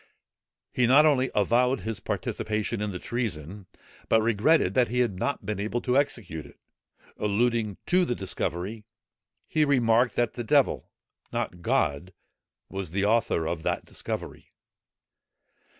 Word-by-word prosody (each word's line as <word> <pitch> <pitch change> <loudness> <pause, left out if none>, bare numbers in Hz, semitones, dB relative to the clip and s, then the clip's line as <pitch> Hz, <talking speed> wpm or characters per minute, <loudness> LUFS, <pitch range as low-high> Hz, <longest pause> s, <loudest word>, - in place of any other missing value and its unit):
He 125 -2 +2
not 140 +5 +7
only 135 -4 +3
avowed 125 +5 +2
his 110 -1 -4
participation 105 0 -2
in 105 -1 -2
the 90 - -4
treason, 100 -4 -4 0.4
but 110 - +5
regretted 115 +8 +3
that 125 -2 +3
he 125 +1 0
had 100 -7 -1
not 140 -4 -2
been 105 -1 -3
able 110 +4 -1
to 125 - 0
execute 105 - -1
it. - - -19 0.6
Alluding 105 0 0
to 180 +1 +3
the 125 -8 -1
discovery, 95 +2 -3 0.6
he 155 - +2
remarked, 120 -4 +3
that 120 -2 +1
the 120 - -4
devil, 140 +3 +2 0.4
not 90 - -3
God, 75 +3 0 0.5
was 95 -3 -5
the 100 +4 0
author 105 -7 +1
of 85 -1 -3
that - - -2
discovery. - - -6
110 Hz, 140 wpm, -27 LUFS, 95-125 Hz, 0.6 s, not